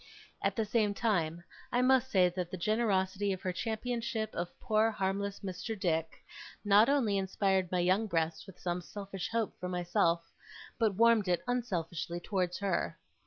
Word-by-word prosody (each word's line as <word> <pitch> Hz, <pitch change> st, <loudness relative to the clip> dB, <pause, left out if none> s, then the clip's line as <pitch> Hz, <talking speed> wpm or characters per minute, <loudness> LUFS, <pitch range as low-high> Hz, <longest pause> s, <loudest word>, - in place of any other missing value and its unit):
At -, -, 0 dB
the 225 Hz, -, 0 dB
same 210 Hz, -1 st, +1 dB
time, 170 Hz, -7 st, 0 dB, 0.3 s
I 245 Hz, 0 st, +2 dB
must 260 Hz, 0 st, +4 dB
say 185 Hz, -6 st, +5 dB
that 180 Hz, -1 st, -4 dB
the 185 Hz, -, -5 dB
generosity 200 Hz, -1 st, +1 dB
of 190 Hz, -, -7 dB
her 185 Hz, -, -1 dB
championship 225 Hz, +1 st, -2 dB
of 175 Hz, +1 st, -5 dB
poor 220 Hz, 0 st, +2 dB
harmless 200 Hz, -1 st, -2 dB
Mr. 195 Hz, +3 st, -5 dB
Dick, 165 Hz, -3 st, -1 dB, 0.4 s
not 205 Hz, +4 st, +6 dB
only 230 Hz, -9 st, +2 dB
inspired 190 Hz, -1 st, 0 dB
my 180 Hz, -1 st, +2 dB
young 190 Hz, +5 st, +2 dB
breast 165 Hz, -1 st, -1 dB
with 190 Hz, -2 st, -13 dB
some 175 Hz, 0 st, -2 dB
selfish 195 Hz, 0 st, -6 dB
hope 230 Hz, -2 st, -1 dB
for 180 Hz, -, -4 dB
myself, 170 Hz, -1 st, +1 dB, 0.5 s
but 220 Hz, -4 st, +2 dB
warmed 230 Hz, -1 st, +4 dB
it 175 Hz, -1 st, +1 dB
unselfishly 175 Hz, -8 st, -2 dB
towards 180 Hz, -1 st, -1 dB
her. 200 Hz, -1 st, -1 dB
195 Hz, 165 wpm, -32 LUFS, 180-220 Hz, 0.5 s, not